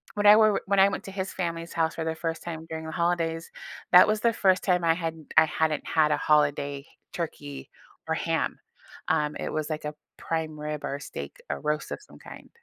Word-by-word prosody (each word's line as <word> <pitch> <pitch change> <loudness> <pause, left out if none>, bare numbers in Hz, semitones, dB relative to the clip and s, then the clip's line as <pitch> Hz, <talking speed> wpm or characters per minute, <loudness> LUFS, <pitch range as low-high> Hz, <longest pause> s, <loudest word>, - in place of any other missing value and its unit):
when 205 0 +2
I 210 - +10
were 215 -2 +4
when 200 0 +2
I 195 +1 +7
went - - -4
to 195 - -7
his 190 -1 -4
family's 170 -2 -4
house 160 -1 0
for 165 - -3
the 160 - -1
1st 165 0 -4
time 165 -2 -6
during 160 0 -5
the 160 - -5
holidays, 170 -1 -1 0.4
that 180 - +9
was 215 0 +1
the 235 - +4
1st 190 -3 +3
time 180 -2 +2
I 165 - +4
hadn't 165 -2 -5
I 160 - +9
hadn't 155 -1 -1
had 155 -1 +3
a 150 - +2
holiday 145 -2 +1 0.3
turkey 70 -2 -6 0.4
or - - +1
ham. - - -1 0.5
Um, 150 -2 +1
it - - -3
was 155 0 -2
like 155 -1 -4
a 150 - -4 0.2
prime 160 -2 -3
rib 150 -1 -4
or - - -2
a - - -14
steak, - - -7
a - - -2
roast 150 0 -2
of - - -4
some - - -17
kind. - - -12
160 Hz, 225 wpm, -27 LUFS, 150-180 Hz, 0.5 s, I